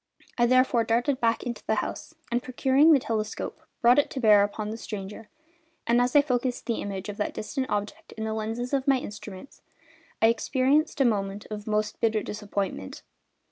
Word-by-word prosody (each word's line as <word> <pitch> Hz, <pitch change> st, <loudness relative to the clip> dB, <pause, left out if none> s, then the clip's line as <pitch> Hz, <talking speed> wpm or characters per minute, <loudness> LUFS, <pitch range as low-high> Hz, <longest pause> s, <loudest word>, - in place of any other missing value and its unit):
I 240 Hz, -1 st, +3 dB
therefore 255 Hz, -1 st, +3 dB
darted 245 Hz, +4 st, +1 dB
back 230 Hz, -1 st, +1 dB
into 240 Hz, -2 st, -5 dB
the -, -, +2 dB
house, -, -, -4 dB, 0.2 s
and 240 Hz, +1 st, +1 dB
procuring 265 Hz, +5 st, +3 dB
the 300 Hz, -, +7 dB
telescope 220 Hz, -4 st, -4 dB, 0.2 s
brought 245 Hz, +3 st, +6 dB
it 290 Hz, -, +1 dB
to 270 Hz, -, -5 dB
bear 210 Hz, -4 st, +6 dB
upon 210 Hz, +1 st, -3 dB
the 225 Hz, -, -5 dB
stranger; 210 Hz, 0 st, -7 dB, 0.6 s
and 235 Hz, +1 st, +3 dB
as 250 Hz, +2 st, 0 dB
I 290 Hz, -, +7 dB
focused 250 Hz, -2 st, -1 dB
the 230 Hz, -, -2 dB
image 195 Hz, -1 st, -5 dB
of 205 Hz, -1 st, -6 dB
that 205 Hz, -, -2 dB
distant 260 Hz, +4 st, -3 dB
object 205 Hz, 0 st, -4 dB
in 220 Hz, -, -6 dB
the 220 Hz, 0 st, -2 dB
lenses 225 Hz, +4 st, -3 dB
of 270 Hz, -1 st, +1 dB
the 275 Hz, -, +4 dB
instrument 205 Hz, -1 st, -8 dB, 0.6 s
I -, -, +4 dB
experienced 270 Hz, +6 st, +1 dB
a -, -, +5 dB
moment 200 Hz, -3 st, -1 dB
of 210 Hz, 0 st, -6 dB
most 215 Hz, 0 st, -1 dB
bitter 220 Hz, -2 st, +1 dB
disappointment. 200 Hz, -, -4 dB
230 Hz, 185 wpm, -26 LUFS, 210-255 Hz, 0.6 s, the